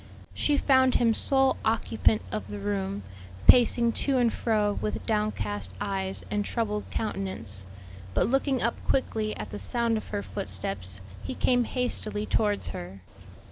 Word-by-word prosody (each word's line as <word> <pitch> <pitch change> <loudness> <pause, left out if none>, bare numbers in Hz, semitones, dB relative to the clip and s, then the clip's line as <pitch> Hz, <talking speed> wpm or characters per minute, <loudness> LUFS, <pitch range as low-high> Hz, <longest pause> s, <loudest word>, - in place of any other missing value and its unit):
She 295 -1 +1
found 260 -2 +4
him 230 -2 +4
sole 270 +2 +3
occupant 110 - +2
of 105 -2 -4
the 105 0 -6
room, 100 0 -2 0.4
pacing 240 -1 +6
to 275 -2 +2
and 240 -2 +3
fro 210 -3 +1
with 210 - -3
downcast 105 - -1
eyes 190 -1 -2
and 205 0 +1
troubled 210 -2 -2
countenance. 115 - -4 0.5
But - - +3
looking 270 +1 +1
up 235 - -1
quickly 220 -5 0
at 105 - -6
the 105 - -5
sound 230 - 0
of 215 - -6
her 205 -1 -3
footsteps 95 0 -4 0.2
he 90 - -4
came 245 -1 +2
hastily 215 -4 -2
towards 210 -2 +1
her. 90 +2 -7
210 Hz, 145 wpm, -27 LUFS, -, 0.5 s, pacing